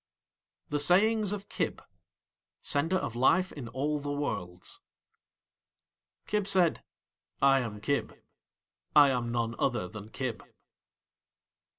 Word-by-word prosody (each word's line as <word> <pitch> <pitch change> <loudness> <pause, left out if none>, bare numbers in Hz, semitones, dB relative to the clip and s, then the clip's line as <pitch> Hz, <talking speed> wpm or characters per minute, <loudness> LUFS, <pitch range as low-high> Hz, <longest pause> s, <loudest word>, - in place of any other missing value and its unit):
THE 145 - 0
SAYINGS 205 +6 +3
OF 205 -1 -5
KIB - - -2 0.8
(Sender 160 +5 +2
of 120 - -4
Life 175 +9 +3
in 135 -6 -8
all 140 +5 -2
the 145 0 -4
Worlds) 90 -11 -4 1.4
Kib 210 -2 -1
said: 185 -4 +4 0.6
"I 135 0 +5
am 110 -4 -5
Kib. 140 +7 -2 0.8
I 145 -2 +8
am 120 -2 -1
none 115 -1 -1
other 120 -8 0
than 105 +2 -10
Kib." 125 -2 -4
140 Hz, 110 wpm, -29 LUFS, 120-175 Hz, 1.4 s, I